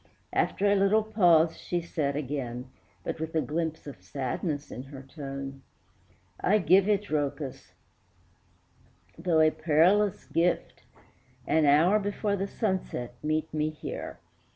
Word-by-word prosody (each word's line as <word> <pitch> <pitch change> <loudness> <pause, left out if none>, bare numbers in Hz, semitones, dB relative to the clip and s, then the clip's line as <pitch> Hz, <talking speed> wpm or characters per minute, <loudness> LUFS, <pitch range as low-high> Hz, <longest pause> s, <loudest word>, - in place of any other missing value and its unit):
After 200 - +1
a 200 - +5
little 200 +2 +3
pause 175 -7 +4
she 175 - -2
said 155 -4 -2
again, 130 -4 -4 0.4
But - - -4
with 160 0 -4
a 160 - +3
glimpse 160 +1 -3
of 145 - -9
sadness 145 +2 -3
in - - -6
her 135 0 -10
tone, 135 -1 -7 0.8
"I 205 +4 +3
give 190 0 +4
it, 205 -1 +2
Rhœcus, 140 - -3 1.4
though 165 -3 +2
a 155 0 +5
perilous 175 +7 +3
gift; 170 +1 0 0.6
An 155 -1 +3
hour 165 +9 +5
before 205 0 -1
the 195 0 -2
sunset 190 - -2
meet 155 +1 -1
me 155 0 0
here." 155 - -6
160 Hz, 130 wpm, -28 LUFS, 145-190 Hz, 1.4 s, a